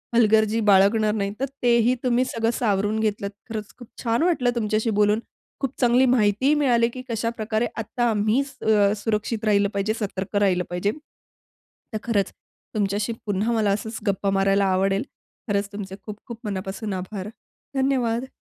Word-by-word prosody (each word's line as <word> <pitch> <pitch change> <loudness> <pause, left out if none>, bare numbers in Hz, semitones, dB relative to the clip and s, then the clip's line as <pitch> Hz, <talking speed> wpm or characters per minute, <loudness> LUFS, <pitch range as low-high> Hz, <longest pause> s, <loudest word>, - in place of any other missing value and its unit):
हलगर्जी 220 -1 +4
बाळगणार 210 +2 +4
नाही 200 -2 -1
तर 270 - +1 0.2
तेही 240 +1 +4
तुम्ही 250 0 +2
सगळं 230 -2 0
सावरून 210 -1 +1
घेतलत. 205 -2 -1 0.2
खरंच 215 -2 -5
खूप 245 -3 -12 0.2
छान 235 +5 +1
वाटलं 315 -9 +2
तुमच्याशी 215 0 0
बोलून, 210 +1 +4 0.4
खूप 270 -1 -2
चांगली 245 +2 +5
माहितीही 220 +4 +3
मिळाली, 235 -4 +3
की 255 +2 -8
कशाप्रकारे 225 0 -1
आता 235 +2 -1
आम्ही 220 +5 +2
स 275 -1 -13
अ, 205 -2 +4
सुरक्षित 220 0 -1
राहिलं 200 -1 +3
पाहिजे, 200 +2 0
सतर्क 195 -1 -4
राहिलं 190 -3 +3
पाहिजे. 180 +4 0 1.0
तर - - 0
खरंच 205 -5 0 0.4
तुमच्याशी 205 +2 0
पुन्हा 205 +2 0
मला 215 -3 +2
असचं 215 +2 -2 0.2
गप्पा 195 0 +1
मारायला 195 +1 +3
आवडेल. 195 +2 +1 0.4
खरंच 200 0 -1
तुमचे 195 -2 -6
खूप-खूप 220 +2 -8
मनापासून 200 +1 -4
आभार, 195 +1 -6 0.5
धन्यवाद! 260 -2 0
215 Hz, 150 wpm, -24 LUFS, 200-235 Hz, 1.0 s, चांगली